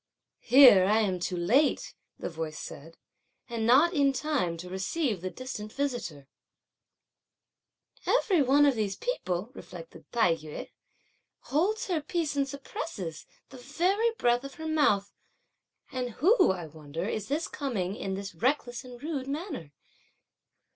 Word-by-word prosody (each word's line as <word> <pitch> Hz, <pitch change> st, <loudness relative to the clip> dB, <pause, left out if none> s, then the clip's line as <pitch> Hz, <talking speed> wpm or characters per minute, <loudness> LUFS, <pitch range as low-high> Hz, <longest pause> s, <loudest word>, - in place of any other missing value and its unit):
"Here 250 Hz, -8 st, +8 dB
I 210 Hz, +3 st, +3 dB
am 190 Hz, -4 st, 0 dB
too 180 Hz, +1 st, -2 dB
late!" 245 Hz, -, +2 dB, 0.2 s
the -, -, -4 dB
voice 160 Hz, -2 st, -5 dB
said, 165 Hz, +3 st, -9 dB, 0.5 s
"and 230 Hz, -2 st, -2 dB
not 290 Hz, +9 st, +6 dB
in 280 Hz, -3 st, +3 dB
time 265 Hz, -, -1 dB
to 175 Hz, +2 st, -8 dB
receive 195 Hz, -, -2 dB
the 185 Hz, -, -3 dB
distant 215 Hz, -2 st, -7 dB
visitor!" 240 Hz, -, -3 dB, 1.8 s
"Every 390 Hz, -9 st, +3 dB
one 280 Hz, +2 st, +5 dB
of 280 Hz, -, +4 dB
all -, -, -9 dB
these 205 Hz, -3 st, -1 dB
people," 210 Hz, -, -3 dB
reflected -, -, -11 dB
Tai 180 Hz, -8 st, +3 dB
yü, 155 Hz, -1 st, -8 dB, 0.7 s
"holds 380 Hz, +10 st, 0 dB
her 345 Hz, -5 st, -1 dB
peace 315 Hz, -1 st, -2 dB
and 275 Hz, -1 st, 0 dB
suppresses 235 Hz, -, -6 dB, 0.2 s
the 265 Hz, -, -11 dB
very 360 Hz, -, +1 dB
breath 240 Hz, +1 st, +2 dB
of 275 Hz, 0 st, -8 dB
her 320 Hz, -1 st, -6 dB
mouth; 210 Hz, -11 st, +2 dB, 0.8 s
and 255 Hz, -2 st, -2 dB
who, 370 Hz, -, +4 dB
I 185 Hz, -3 st, -1 dB
wonder, 155 Hz, +3 st, -6 dB
is 215 Hz, -2 st, -3 dB
this 305 Hz, +4 st, -1 dB
coming 205 Hz, -10 st, -3 dB
in 195 Hz, -3 st, -3 dB
this 195 Hz, -1 st, -6 dB
reckless 245 Hz, -, -1 dB
and 250 Hz, -1 st, -11 dB
rude 290 Hz, -4 st, -3 dB
manner?" 285 Hz, -, -5 dB
245 Hz, 145 wpm, -29 LUFS, 185-290 Hz, 1.8 s, Here